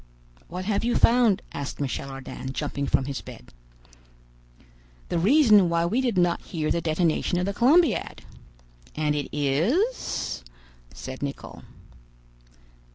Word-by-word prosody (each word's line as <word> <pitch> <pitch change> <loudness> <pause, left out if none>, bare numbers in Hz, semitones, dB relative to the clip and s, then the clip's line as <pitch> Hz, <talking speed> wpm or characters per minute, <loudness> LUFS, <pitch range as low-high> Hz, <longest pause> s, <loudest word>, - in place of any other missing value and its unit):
"What 180 +2 -6
have 205 +1 0
you 240 +1 +1
found?" 230 -5 +4
asked 140 -1 -5
Michel 140 0 -3
Ardan, 135 0 -7
jumping 140 -1 -3
from 130 - +1
his 140 -1 -4
bed. 60 - -13 1.6
"The 170 - 0
reason 210 - +5
why 170 0 +1
we 225 +9 +1
did 240 -7 -1
not 175 -1 +2
hear 155 -3 -3
the 170 - +1
detonation 165 +2 0
of 180 - 0
the 200 - -2
Columbiad." 295 - +2 0.7
"And 150 -1 0
it 145 -1 -3
is—?" 165 - -1 0.5
said 65 - -8
Nicholl. 140 -1 -6
170 Hz, 130 wpm, -25 LUFS, 145-220 Hz, 1.6 s, reason